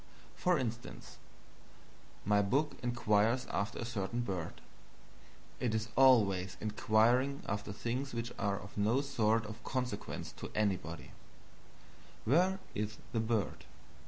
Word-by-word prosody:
For 180 -2 +2
instance, 120 -2 -5 1.1
my 105 0 +4
book 140 +10 +1
inquires 120 0 +2
after 100 +2 -1
a 120 - -3
certain 115 0 -2
bird 95 -8 -4 1.0
(it 115 -3 0
is 110 +2 -1
always 100 -8 +5
inquiring 115 +6 +2
after 105 0 -2
things 125 +6 -3
which 115 0 -3
are 100 0 0
of 100 - -10
no 110 +6 +2
sort 115 -5 +1
of 110 +2 -8
consequence 125 -5 -3
to - - -6
anybody): 85 -7 -1 1.1
"Where 180 - +4 0.2
is 105 +1 -3 0.2
the 115 - +1
bird?" 110 -2 -1
110 Hz, 120 wpm, -34 LUFS, 105-125 Hz, 1.1 s, always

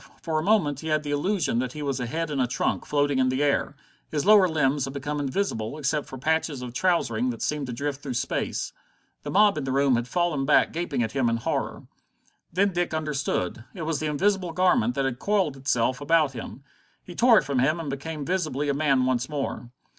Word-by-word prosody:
For 160 -2 -1
a - - -3
moment 170 -9 +2
he 160 - -7
had 155 -1 +1
the 145 - -4
illusion 150 - 0
that 130 0 -2
he 150 - -6
was 135 -2 -2
a 125 - -2
head 165 +5 -3
and 140 -3 0
a 125 - +2
trunk, 125 - -1
floating 145 -2 +1
in 130 0 +3
the 130 +3 0
air. 145 0 +1 0.3
His 150 -2 -2
lower 205 -2 +7
limbs 145 -3 +1
had 135 +1 -7
become 145 +2 -3
invisible, 140 - -2
except 150 0 -1
for 130 - -8
patches 155 -1 -1
of 120 -1 -7
trousering 130 -7 +1
that 115 -2 -4
seemed 150 -3 -1
to - - -4
drift 140 +3 -3
through 130 -4 -5
space. - - -2 0.5
The - - -6
mob 205 -4 +4
in - - -4
the 135 - -2
room 135 -1 +3
had 120 +1 -2
fallen 175 -3 0
back 145 +2 +3
gaping 170 -7 -1
at 110 - -3
him 130 -2 +1
in 115 - 0
horror. 115 - -3 0.7
Then 195 +2 +2
Dick 175 -2 -1
understood. 145 - -2
It 170 - -5
was 155 -2 -1
the 155 - -2
invisible 185 +3 0
garment 160 -10 +2
that 135 - 0
had 125 -2 -2
coiled 195 -8 +1
itself 130 0 0
about 155 -1 +3
him. 120 +1 -8 0.4
He 175 - -10
tore 235 +4 +5
it - - +4
from 135 -1 -1
him 155 +6 +2
and 155 -4 -4
became 145 +2 -5
visibly 155 -5 -1
a - - +2
man 140 -3 +2
once 130 0 0
more. 140 -4 -4
145 Hz, 225 wpm, -26 LUFS, 130-160 Hz, 0.7 s, lower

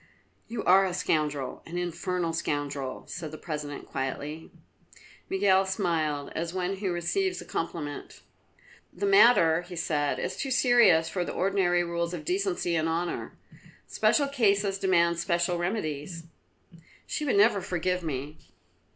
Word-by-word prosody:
"You 235 - -4
are 190 +2 +6
a 185 -2 -1
scoundrel 150 -6 -1
an 170 +1 -5
infernal 175 0 -2
scoundrel," 145 -4 -3
said 160 -3 -6
the 155 - -8
President 150 -3 -6
quietly. 145 +4 -5 0.8
Miguel 195 0 +3
smiled, 165 -7 -1
as 170 +2 -3
one 185 +1 -1
who 190 -2 -2
receives 370 - -1
a - - -9
compliment. 155 -3 -5 0.7
"The 400 - -3
matter," 235 - +6
he 175 0 -10
said, 150 -3 0
"is 185 - -3
too 270 - -3
serious 240 -11 +5
for 180 +2 -2
the - - -5
ordinary 185 -2 +2
rules 170 0 -2
of 155 -3 -8
decency 180 -2 0
and 160 0 +1
honour. 170 +1 -3 0.5
Special 285 -2 +2
cases 200 -7 +1
demand 170 -3 +2
special 175 0 0
remedies." 165 -3 -3 0.8
"She 305 - -3
would 280 - +1
never 205 -1 +4
forgive 180 0 -1
me." 145 0 -5
175 Hz, 140 wpm, -28 LUFS, 160-195 Hz, 0.8 s, are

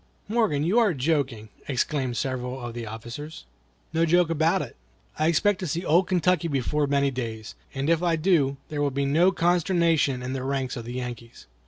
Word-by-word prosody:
"Morgan, 210 -10 +1
you 190 +9 +3
are 210 -8 +3
joking!" 130 -6 -1 0.2
exclaimed 130 -2 -1
several 130 -1 -3
of 120 -2 -6
the 115 -1 -6
officers. 120 - -8 0.5
"No 165 - +2
joke 170 0 +3
about 165 +3 +2
it. 125 - -10 0.4
I 155 - +3
expect 195 +4 +2
to 185 - -3
see 170 +4 -2
old 175 +4 +3
Kentucky 180 -2 +2
before 145 +1 0
many 140 0 +2
days; 115 -4 -5 0.2
and 135 +1 -2
if 165 0 +3
I 170 -2 +2
do, 155 -5 +2
there 150 -1 -3
will 145 - +2
be 140 +1 -1 0.3
consternation 170 -6 +2
in 130 +1 -3
the 135 - -3
ranks 135 -1 -2
of 120 -3 -6
the 120 - -6
Yankees." 120 -2 -7
145 Hz, 185 wpm, -25 LUFS, 125-170 Hz, 0.5 s, you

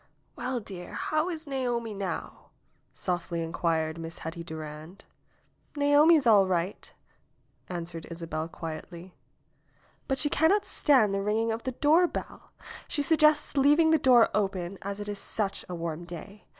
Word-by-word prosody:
^^ell, 245 -2 -3
dear, 180 -3 -8
how 310 +3 0
is 325 -2 -5
Naomi 245 -5 -2
now 195 -2 -5 0.2
?" - - -42
softly 175 -2 -2
inquired 165 -1 -1
Miss 165 0 -6
Hetty 165 +1 -6
Durand. 155 +3 -9 0.7
^^Naomi 290 +3 +5
is 285 - -1
all 205 -4 +6
right," 180 +1 -2 0.8
answered 170 -2 -6
Isabel 165 -2 -4
quietly, 170 +2 -8 1.0
^'but 270 - +1
she 280 - +2
cannot 320 +8 +3
stand 250 -9 +3
the 195 - 0
ringing 220 +3 0
of 225 +1 -3
the 260 - -2
doorbell. 315 +7 +1 0.4
She 290 - -1
sug 320 +2 +2
gests 305 -1 +4
leaving 295 +4 +5
the 320 - +4
door 245 -4 +6
open, 195 -2 -2
as 200 +1 -5
it 205 - -5
is 205 -1 -4
such 205 -3 -2
a 180 - -4
warm 170 0 -4
day. 175 +4 -10
200 Hz, 150 wpm, -28 LUFS, 170-275 Hz, 1.0 s, all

